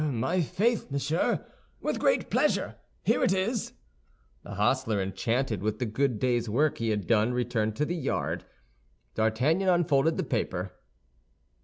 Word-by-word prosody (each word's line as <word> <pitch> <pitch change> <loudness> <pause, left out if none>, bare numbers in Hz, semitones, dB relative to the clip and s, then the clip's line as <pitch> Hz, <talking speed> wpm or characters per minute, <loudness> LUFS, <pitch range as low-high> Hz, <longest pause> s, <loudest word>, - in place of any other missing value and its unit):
"My 155 +5 0
faith, 220 - 0
monsieur, 140 +4 0 0.3
with - - -2
great - - +1
pleasure! - - +1 0.3
Here - - +2
it - - +3
is!" 200 +4 -1 0.7
The - - -8
hostler, 110 +1 +1
enchanted 105 +4 -1
with 110 +1 -1
the 125 - -1
good 120 +2 0
day's 120 0 0
work 145 +8 +1
he 115 -1 0
had 105 -3 -1
done, 115 +3 +2
returned 115 -3 0
to 150 - 0
the 175 - -2
yard. 165 - -2 0.7
D'Artagnan 135 - +2
unfolded 160 -3 +3
the - - 0
paper. 95 -6 -2
125 Hz, 145 wpm, -28 LUFS, 110-155 Hz, 0.7 s, it